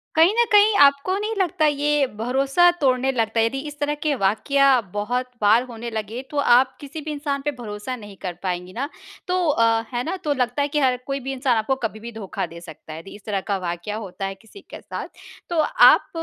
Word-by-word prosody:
कहीं 330 +5 +5
न 475 - +6
कहीं 415 0 +6
आपको 280 +7 +2
नहीं 430 +2 -3
लगता, 360 -4 +1
ये 295 -1 +2
भरोसा 270 +9 +3
तोड़ने 260 0 +2
लगता 225 -2 0
है? 225 - +4
यदि 270 +4 -2
इस 295 - -9
तरह 295 0 0
के 305 -2 +1
वाक़या 255 +7 +2 0.3
बहुत 245 +5 -2
बार 215 +4 +5
होने 235 0 -6
लगे, 220 +2 -4
तो 295 - -5
आप 260 -1 +4
किसी 290 +2 -7
भी 305 +1 -5
इंसान 285 -1 -3
पे 295 - +1
भरोसा 210 +2 -5
नहीं 205 -4 -11
कर 180 -2 -4
पाएँगी 180 0 -3
ना। 275 +4 -3 0.4
तो 365 0 +1
अ, 230 -4 +3
है 240 - -1
ना? 335 +6 -3
तो 295 - +1
लगता 250 +1 -1
है 285 - +1
कि 300 - +2
हर 255 -2 +2
कोई 275 0 -2
भी 270 +1 -5
इंसान 255 -2 +1
आपको 220 +5 0
कभी 220 -1 -4
भी 235 +2 -8
धोखा 220 -4 -4
दे 170 - -11
सकता 160 -2 -11
है। 160 - -7
दी 195 - -11
इस 205 - -15
तरह 205 -2 -1
का 200 -2 0
वाक़या 175 +3 -4
होता 195 -3 -6
है 195 0 -4
किसी 225 - -16
के - - -9
साथ, - - -6 0.4
तो 340 - 0
आप - - +5
250 Hz, 230 wpm, -22 LUFS, 215-290 Hz, 0.4 s, न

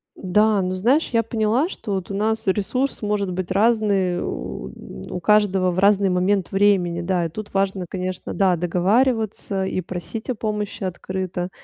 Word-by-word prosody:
Да, 210 +2 +2
ну 185 0 -1
знаешь, 250 - +2
я 230 0 +3
поняла, 230 - +1
что 210 - -5
вот 190 0 -3
у - - -3
нас 220 +2 0
ресурс 230 +8 0
может 205 -3 -1
быть 185 0 -4
разный 200 -4 +2
у 180 - -6
каждого 195 -1 +3
в 175 - -2
разный 200 0 +4
момент 185 +1 +1
времени, 195 -4 +2
да, 175 -1 0
и - - -2
тут 205 +6 -8
важно, 195 -1 0
конечно, 185 -1 -4
да, 190 -2 +3
договариваться 200 +3 +1
и 190 - -2
просить 185 +6 -6
о 255 - 0
помощи 210 -1 -3
открыто, 185 -1 -3
195 Hz, 160 wpm, -22 LUFS, 185-215 Hz, -, разный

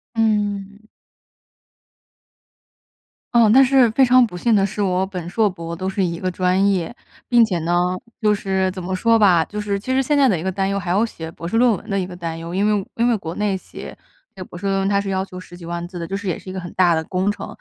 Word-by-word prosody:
嗯。 210 -1 -1 2.5
嗯， 230 -3 +5
但 265 +4 +7
是 260 -2 +4
非 265 +4 +4
常 250 0 +5
不 180 -6 -8
幸 225 +4 +2
的 195 - +3
是， 205 +1 -4
我 185 -1 +1
本 180 -3 -6
硕 215 +2 +2
博 170 -2 -7
都 185 +2 -3
是 195 0 -1
一 170 -2 -2
个 185 0 -2
专 185 +2 +2
业。 190 +4 -2 0.3
并 240 -2 +5
且 185 -6 0
呢， 170 +2 0 0.5
就 210 -1 +3
是 190 -2 -1
怎 185 0 -7
么 185 +1 -3
说 230 +4 +3
吧， 180 -6 +5
就 210 - -7
是 205 -1 -1
其 235 +6 -5
实 265 - +3
现 290 +2 +1
在 275 -2 +5
的 185 -7 +1
一 - - -6
个 190 - -1
担 195 +1 -1
忧， 200 0 -1
还 175 -2 -6
有 205 +5 +3
写 160 -7 -8
博 170 0 -10
士 225 - -1
论 245 +1 +5
文 - - -11
的 195 -1 0
一 180 - -3
个 180 - -9
担 165 -2 -5
忧。 170 +2 -6
因 200 - +1 0.2
为 - - -11
因 235 +1 +1
为 235 -3 +2
国 165 -3 -7
内 205 -2 0
写 - - -10 0.5
博 - - -9
士 190 - -8
论 195 0 +1
文 195 0 0
它 200 0 +2
是 200 - -5
要 190 0 -1
求 185 -1 -11
10 175 -1 -12
几 175 - -11
万 170 0 -4
字 175 -1 -8
的， 170 - -5
就 195 - -4
是 200 -1 -4
也 170 - -2
是 185 - -11
一 - - -6
个 190 - -4
很 175 - -9
大 175 -2 +3
的 160 - -1
工 185 +4 -1
程， 205 - -4
195 Hz, 280 characters per minute, -20 LUFS, 180-210 Hz, 2.5 s, 但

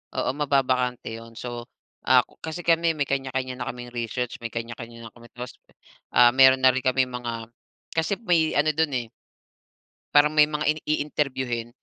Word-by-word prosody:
oo, - - 0
mababakante 130 -4 0
yun. 115 0 -11
So, 120 -1 -6 0.4
ah, - - +6 0.2
kasi 160 +1 -5
kami 165 0 +4
may 145 -3 -2
kany-kanya 130 -1 -2
na - - -6
kaming 120 0 -10
research, 120 +1 -3
may 115 - -4
kanya-kanya 115 0 -7
na - - -14
kami, 120 -1 -15
tapos, 125 0 -8 0.6
ah, 120 0 +7
meron 130 0 +7
na 130 - +8
rin 130 - -2
kaming 130 0 +2
mga 120 -2 -5 0.5
kasi 165 +5 0
may 165 -4 +2
ano 150 +2 +3
do'n 160 -2 +1
eh 120 -2 -2 1.1
parang 145 +1 +6
may 150 - +8
mga 150 0 -3
ini 155 0 0
i-interview-hin. 130 -6 -2
130 Hz, 165 wpm, -25 LUFS, 120-150 Hz, 1.1 s, na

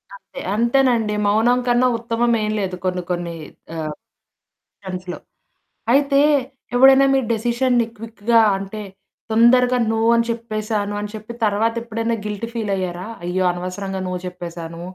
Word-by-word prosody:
అంతే, - - -12 0.2
అంతేనండి, 235 -2 +2
మౌనం 230 +4 +3
కన్నా 245 +1 +4
ఉత్తమం 235 +1 0
ఏం 215 - -1
లేదు 190 -2 -2
కొన్ని 180 0 0
కొన్ని 175 -1 -3 0.4
ఆహ్, 155 -2 -3 0.9
సెన్స్‌లో. 185 -2 -6 0.7
అయితే 280 +1 +4 0.6
ఎవడైనా 270 +2 +7
మీ 270 - +4
డిసిషన్‌ని 240 +1 +1
క్విక్‌గా 230 +1 +1 0.2
అంటే, 195 +2 -6 0.5
తొందరగా 250 +2 +5
నో 225 - 0 0.2
అని 230 0 +2
చెప్పేసాను 215 -3 -2
అని 210 - -4
చెప్పి 215 +2 -8
తరువాత 215 +2 +1
ఎప్పుడైనా 230 0 -2
గిల్టీ 210 +2 -4
ఫీల్ 220 -4 -2
అయ్యారా? 185 0 -4 0.2
"అయ్యో! 180 +2 -1
అనవసరంగా 185 +2 -5
నో 185 - -3
చెప్పేసాను, 170 -2 -7
220 Hz, 130 wpm, -20 LUFS, 190-235 Hz, 0.9 s, ఎవడైనా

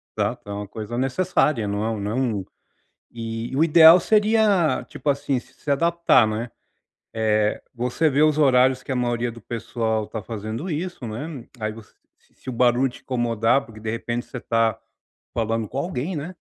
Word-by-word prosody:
Tá, - - 0
então 100 0 -6
a 100 - -10
coisa 110 +3 -6
necessária 130 - +1
não 100 +1 -2
é 110 -2 -2
não 105 +4 -2 0.2
um 95 - -7 0.7
e 115 +1 -5
o 160 - +4
ideal 165 +1 +8
seria, 210 -4 +3
tipo 145 - -2
assim, 140 -2 -1
se 145 - -20
adaptar 170 -5 +4
né, 110 +2 -3 0.6
eh, 110 -1 +1
você 125 +6 +1
vê 145 +1 +2
os 155 0 +3
horários 130 -2 +4
que 135 - -5
a 130 - -1
maioria 120 -1 0
do 115 - -12
pessoal 110 -1 -2
tá 110 - -6
fazendo 110 - -5
isso, 165 -4 -4
né, 130 +3 -6
aí 110 0 -2
você 110 -1 -14 0.3
se - - -18
o 130 - -2
barulho 125 +2 +3
te 120 - -13
incomodar, 120 0 +1
porque 110 -2 -13
de 110 0 -3
repente 120 +1 -3
você 125 - -7
tá, 115 -2 +1 0.6
falando 115 -2 -1
com 135 - -5
alguém 170 +2 -3
né. 160 +6 -5
120 Hz, 175 wpm, -23 LUFS, 110-150 Hz, 0.7 s, ideal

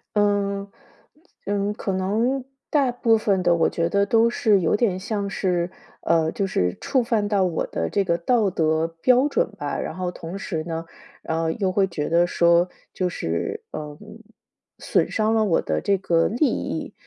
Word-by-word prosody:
嗯， 200 -1 +1 0.8
嗯， 205 0 -1
可 200 -2 -3
能 225 +8 0 0.3
大 275 -4 +2
部 230 -2 +3
分 200 -3 +1
的 175 -1 +4
我 165 -1 +2
觉 165 0 -1
得 200 +1 +2
都 225 +3 +4
是 215 -4 +3
有 170 +1 +2
点 210 -4 +1
像 205 0 -3
是 180 -2 -1 0.3
呃， 165 -1 +2
就 200 - -1
是 90 - -1
触 275 -2 +1
犯 225 -3 0
到 200 -3 +2
我 175 - -1
的 - - -2
这 200 - +1
个 170 -3 +1
道 210 +4 +2
德 160 -2 +1
标 255 - +4
准 - - +1
吧。 145 -5 -3
然 - - -4
后 180 -1 -3
同 170 +1 -7
时 165 -5 -4
呢 165 -1 -4 0.4
然 160 0 -2
后 165 0 0
又 190 +3 -1
会 195 +1 +2
觉 155 -5 -3
得 170 +1 +3
说， 170 0 +3 0.3
就 185 - -1
是， 85 - -3
呃， 150 -1 -6 0.8
损 - - +1
伤 220 0 +1
了 220 -1 +3
我 180 -5 +2
的 - - -1
这 200 -1 +2
个 170 -3 +2
利 245 +8 +1
益。 - - -4
195 Hz, 195 characters per minute, -23 LUFS, 170-215 Hz, 0.8 s, 的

